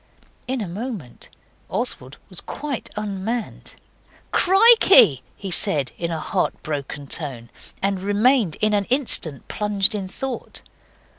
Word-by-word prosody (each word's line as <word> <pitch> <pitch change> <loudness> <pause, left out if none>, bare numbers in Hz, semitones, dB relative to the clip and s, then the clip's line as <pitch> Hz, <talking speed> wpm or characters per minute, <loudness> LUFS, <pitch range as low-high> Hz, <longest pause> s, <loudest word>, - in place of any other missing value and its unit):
In 260 -1 -2
a 205 - -4
moment 195 - -7 0.4
Oswald 130 +3 -2
was 185 - -11
quite 285 -4 -5
unmanned. 210 +2 -4 0.6
'Krikey!' 385 - +6 0.2
he 195 -2 -6
said, 145 -6 +2
in 170 - -3
a 165 -1 -3
heart 180 +4 -1
broken 145 -1 -5
tone, 130 -6 -4 0.3
and 195 -1 0
remained 205 - +2
an 215 0 +3
instant 235 - +1
plunged 210 0 +2
in 200 -3 -4
thought. 255 +6 -5
200 Hz, 120 wpm, -22 LUFS, 155-240 Hz, 0.6 s, Krikey